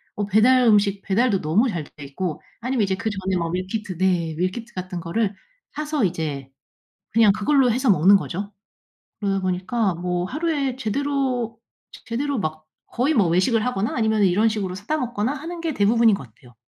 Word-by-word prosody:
뭐 205 - -1
배달 230 +6 +4
음식 205 -2 +3
배달도 205 +1 +1
너무 195 +12 +2
잘 170 -7 -3
돼 145 0 -13
있고 155 +4 -4 0.2
아니면 255 -1 0
이제 190 -1 0
그전에 195 -3 -2
뭐 170 -1 -1
밀키트 185 +1 -4
네. 175 -3 +1
밀키트 190 +7 -3
같은 185 -1 -5
거를 195 +4 -1 0.4
사서 300 -3 -2
이제 150 -6 -3 0.6
그냥 220 -2 +5
그걸로 250 +4 +2
해서 255 +2 +1
먹는 190 +1 +6
거죠. 195 +2 -5 0.7
그러다 195 -2 0
보니까 185 +3 -1
뭐 180 +1 -2
하루에 285 - -1
제대로, 260 -2 -1 0.3
제 - - -12
제대로 270 +3 -2
막 155 -2 -4 0.2
거의 265 +6 0
뭐 200 - +3
외식을 190 +6 +2
하거나 225 -4 -1
아니면은 220 -2 +2
이런 200 +5 +3
식으로 200 -4 -3
사다 215 +11 -3
먹거나 240 -2 -1
하는 335 +4 -7
게 330 -1 -2
대부분인 225 +2 +4
것 135 - -9
같아요. 120 +2 -20
205 Hz, 365 characters per minute, -23 LUFS, 185-245 Hz, 0.7 s, 먹는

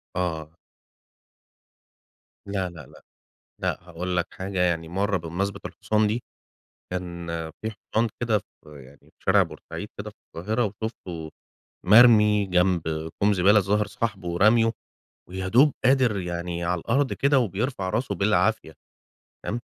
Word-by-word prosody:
آه. 80 -3 -3 1.9
لا، 95 -2 -2
لا، 80 -5 -11
لأ، - - -18 0.6
لأ - - 0
هاقول 90 +1 -4
لك 85 - +1
حاجة، 95 0 -5
يعني 85 -2 +1
مرّه 100 +3 0
بمناسبة 95 +4 -3
الحصان 110 0 0
دي، 110 +4 -1 0.7
كان 85 -2 -5 0.3
في 110 0 -3
حصان 110 +2 -1
كده 115 -3 +2
ف - - -28
يعني 70 -2 -14
في - - -26
شارع - - +5
بورسعيد - - -8
كده - - -5
في - - -19 0.2
القاهرة 110 +8 -1
وشُفته 95 -6 -6 0.5
مرمي 105 -1 +7
جنب 90 -1 +2 0.4
كوم 105 +1 +4
زبالة، 95 +3 +5
الظاهر 105 +2 +1
صاحبُه 100 -8 -3
راميه، 115 +3 +5 0.6
ويا 95 +1 -4
دوب 135 +8 +5
قادر 130 -4 +4
يعني 85 -1 -4
على 90 0 0
الأرض 135 - +1
كده 140 0 +3
وبيرفع 110 -2 -1
راسُه 115 0 -1
بالعافية، 100 -2 +1 0.7
تمام، 115 - -2
95 Hz, 135 wpm, -25 LUFS, 90-110 Hz, 1.9 s, مرمي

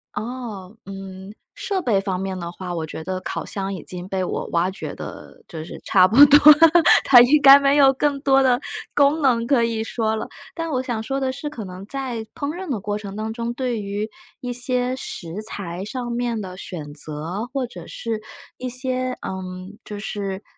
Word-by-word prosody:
哦， 220 -4 -6
嗯， 195 0 -9 0.2
设 385 -2 -2
备 210 - +1
方 190 -2 -2
面 190 -1 -3
的 170 -1 -5
话， 180 0 -6
我 160 -1 -3
觉 155 - -7
得 185 +3 -4
烤 - - -4
箱 195 -1 -3
已 180 - -6
经 180 0 -7
被 190 -1 -1
我 - - -3
挖 170 +2 +2
掘 190 - -6
得 - - -10
就 160 -3 -7
是 160 - -9
差 185 -2 +5
不 220 +7 0
多 290 +1 +9
了， 290 - +7 0.5
它 250 -3 +9
应 280 +5 +5
该 275 0 +10
没 280 0 +3
有 270 -2 +6
更 285 +1 0
多 270 -1 +4
的 250 -1 +3 0.3
功 290 +2 +3
能 235 -4 +2
可 265 -5 +3
以 230 -1 -1
说 220 -1 -1
了。 - - -4 0.3
但 330 -1 -4
我 260 -4 -1
想 240 -4 -3
说 270 +4 -3
的 265 -1 0
是， 295 +3 -5
可 240 -7 -7
能 185 0 -9
在 255 -4 -4
烹 285 - -3
饪 375 -2 -6
的 235 -7 -1
过 205 +1 -2
程 200 -2 -8
当 220 +1 -3
中， 235 +1 -3
对 240 -3 -2
于 205 +2 -3 0.3
一 250 - -4
些 250 +1 -1
食 175 -3 -6
材 190 -3 -4
上 240 +1 -5
面 235 -1 -1
的 185 -1 -8
选 155 -6 -7
择， 160 +9 -5
或 270 -2 -1
者 245 - -11
是 225 -2 -4 0.4
一 255 - -5
些 255 0 -2
嗯， 185 +1 -7
就 210 - -7
是 200 -2 -4
220 Hz, 220 characters per minute, -22 LUFS, 190-255 Hz, 0.5 s, 该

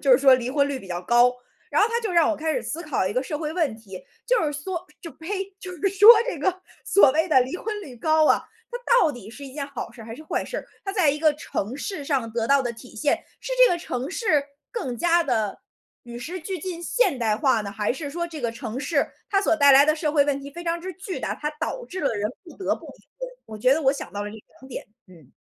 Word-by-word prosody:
就 275 -3 +4
是 250 - +7
说 270 -1 +7
离 250 0 -2
婚 285 -1 +2
率 275 -2 -3
比 195 - -12
较 180 -1 -4
高。 240 +4 +4 0.4
然 - - +3
后 - - +5
它 465 +1 -1
就 440 -4 -2
让 340 -1 +4
我 - - +1
开 315 +1 -2
始 - - -1
思 335 +2 -5
考 275 - -1
一 195 - -1
个 255 - 0
社 295 +2 -4
会 310 -1 -3
问 310 -11 0
题， 195 -5 -11 0.2
就 - - +3
是 300 - +1
缩 345 +3 -4 0.2
就 335 - -7
呸， 385 +4 -4 0.2
就 370 - -7
是 360 +2 -3
说 395 +3 +6 0.2
这 - - -3
个 370 0 -1 0.2
所 285 -10 +5
谓 320 +4 +1
的 260 -5 +5
离 260 +5 -5
婚 425 -1 -4
率 275 -9 -10
高 310 +5 +3
啊， - - +4 0.3
它 485 - -4 0.3
到 310 - +2
底 220 -4 -10
是 280 +5 -10
一 265 - -9
件 280 -1 -4
好 280 -3 -7
事 230 - -12
还 225 +1 -8
是 305 - -11
坏 - - -1
事？ - - -6 0.2
它 390 - -3
在 370 -8 +3
一 295 - -3
个 310 0 +4
城 250 -4 -4
市 300 +1 -5
上 265 -5 -1
得 230 -1 -1
到 280 +1 +4
的 240 - -2
体 240 +2 -14
现， 285 +6 +1 0.2
是 - - -5
这 - - +2
个 345 - +1
城 260 -2 -4
市 315 - +2 0.3
更 265 - -4
加 345 +5 +3
地 215 - -1 0.4
与 240 0 -8
时 350 +9 -6
俱 370 +3 -4
进 345 +1 -5
现 345 - +1
代 220 -3 +1
化 260 -2 +2
呢， 200 -1 -5
还 210 +2 -1
是 285 +3 -5
说 340 +4 -3
这 320 -3 -8
个 235 -2 -1
城 230 +1 -6
市， 295 -2 +1 0.2
它 395 - +2
所 390 - +3
带 285 -3 +6
来 275 +1 +8
的 305 0 +3
社 310 -1 -1
会 290 -2 +4
问 280 -1 0
题 280 +1 -9
非 345 +4 -9
常 335 0 -1
之 375 - -5
巨 380 0 -6
大， - - -2
它 300 - -3
导 - - -3
致 370 -5 -6
了 280 - 0
人 210 +1 -1
不 330 - -13
得 380 - 0
不 - - -12
离 - - -14
婚， - - -5 0.2
我 215 -1 -9
觉 255 +5 +4
得 320 - -2
我 270 -1 +4
想 280 - -7
到 205 - -4
了 210 - -5
这 220 - -10 0.2
两 265 - -14
点。 - - -6 0.2
嗯。 165 -8 -17
290 Hz, 295 characters per minute, -24 LUFS, 245-345 Hz, 0.4 s, 来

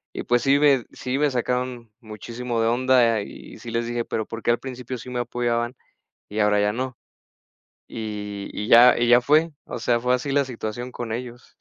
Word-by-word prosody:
y, - - -3
pues, 120 -1 +1
sí 140 +1 +4
me 140 -4 +4
sí 130 +1 -3
me 150 -1 +2
sacaron 125 -2 -2
muchísimo 115 +2 -4
de 115 - +2
onda 120 -2 +3
y - - -10
sí 115 - -8
les 115 0 -1
dije: 120 0 -2
"Pero 110 - -3
¿por 115 0 -7
qué - - +3
al 120 - +1
principio 130 -1 -6
sí 125 - -9
me 125 -1 -3
apoyaban 120 0 -1 0.5
y 105 - -4
ahora 105 -1 +3
ya 105 0 +1
no?" 125 +1 -4 0.9
Y 105 -2 -6
y 105 - -4
ya 120 +1 +8
y 120 0 +2
ya 120 +1 +7
fue. 155 +5 +3
O - - -6
sea, 120 +1 +1
fue 125 +1 +2
así 130 +2 -2
la 140 0 +3
situación 120 0 -6
con 120 -2 -5
ellos. 120 +1 -7
120 Hz, 205 wpm, -23 LUFS, 115-125 Hz, 0.9 s, ya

